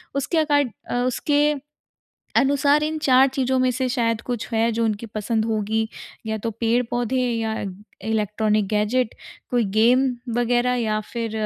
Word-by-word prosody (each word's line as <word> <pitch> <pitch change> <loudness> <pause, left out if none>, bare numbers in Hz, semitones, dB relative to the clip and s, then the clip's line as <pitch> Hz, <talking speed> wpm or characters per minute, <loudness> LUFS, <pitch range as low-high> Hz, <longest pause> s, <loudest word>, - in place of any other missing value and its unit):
उसके 280 +4 -1
अकॉड 290 -5 +2 0.2
अ, - - -2
उसके 290 +4 +2 0.8
अनुसार 285 +2 +3
इन 310 0 -2
4 265 -1 +5
चीज़ों 260 -1 +1
में 255 0 +3
से 255 +1 -1
शायद 230 -3 0
कुछ 240 -3 -4
है 225 +1 +2
जो 230 +1 0
उनकी 220 +1 -2
पसंद 220 +1 -1
होगी। 220 0 -1 0.4
या 220 0 -2
तो 225 +2 -3
पेड़-पौधे 240 +2 0 0.2
या 220 -1 -1 0.5
इलेक्ट्रॉनिक 215 -1 +1
गैजेट, 215 +3 0 0.4
कोई 245 -2 +2
गेम 250 +4 +5 0.3
वगैरह 245 +1 +2
या 215 -3 0
फिर 230 -2 -3
240 Hz, 145 wpm, -23 LUFS, 220-260 Hz, 0.8 s, 4